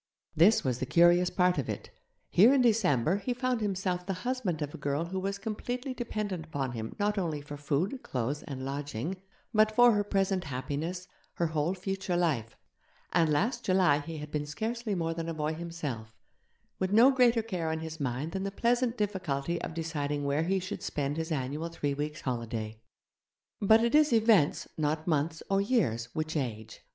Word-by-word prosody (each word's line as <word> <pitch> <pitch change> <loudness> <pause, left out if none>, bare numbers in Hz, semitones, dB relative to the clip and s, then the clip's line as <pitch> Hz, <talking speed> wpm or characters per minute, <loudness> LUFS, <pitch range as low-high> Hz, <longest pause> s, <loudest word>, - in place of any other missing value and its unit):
This 190 +8 +5
was 125 -2 -1
the 130 - -2
curious 175 +4 +5
part 180 -3 +2
of 135 - -3
it - - -5 0.4
here 230 +10 +7
in 260 - +4
December 190 - +3
he 245 +4 -3
found 250 -1 0
himself 185 -3 -1
the 195 +2 -2
husband 220 -12 -1
of 145 - -6
a - - -6
girl 145 +3 -1
who 190 +2 -3
was 195 +1 -2
completely 245 +5 -4
dependent 210 -8 -3
upon 135 -5 -2
him 110 -2 -5
not 205 0 +1
only 160 -5 -2
for 145 0 -8
food, 155 - -1
clothes, 130 +4 -2
and 135 -4 -6
lodging, 145 +5 -4 0.3
but 215 0 +4
for 245 0 +7
her 205 -2 +2
present 195 -2 0
happiness, 155 +7 -4 0.3
her 170 - 0
whole 160 +3 0
future 190 -1 -2
life; 135 -11 0 0.6
and 165 -3 +3
last 230 - +1
July 185 -6 +3
he 160 +2 -6
had 150 0 -7
been 150 -1 -2
scarcely 220 +7 -3
more 165 -2 -1
than 165 0 -4
a 165 - -3
boy 155 0 -1
himself, 150 -10 -6 0.6
with 185 0 0
no 235 +6 +7
greater 245 -3 +4
care 180 -7 -2
on 160 0 -2
his 160 0 -6
mind 135 +3 -2
than 190 - -3
the 195 - -1
pleasant 240 +3 +1
difficulty 170 -6 -1
of 165 - -5
deciding 145 -3 -2
where 145 +3 +1
he 190 +2 +1
should 185 0 -5
spend 145 0 -2
his 160 +1 -3
annual 150 +3 -2
three 145 -4 -2
weeks' 150 +3 -4
holiday. 115 -3 -4 0.8
But 220 +3 +6
it 235 - +1
is 300 -1 +5
events, 220 -9 +4
not 155 +1 0
months 160 0 0
or 195 0 +2
years, 135 - +1
which 155 0 -2
age. 110 -6 -4
170 Hz, 185 wpm, -30 LUFS, 145-205 Hz, 0.8 s, here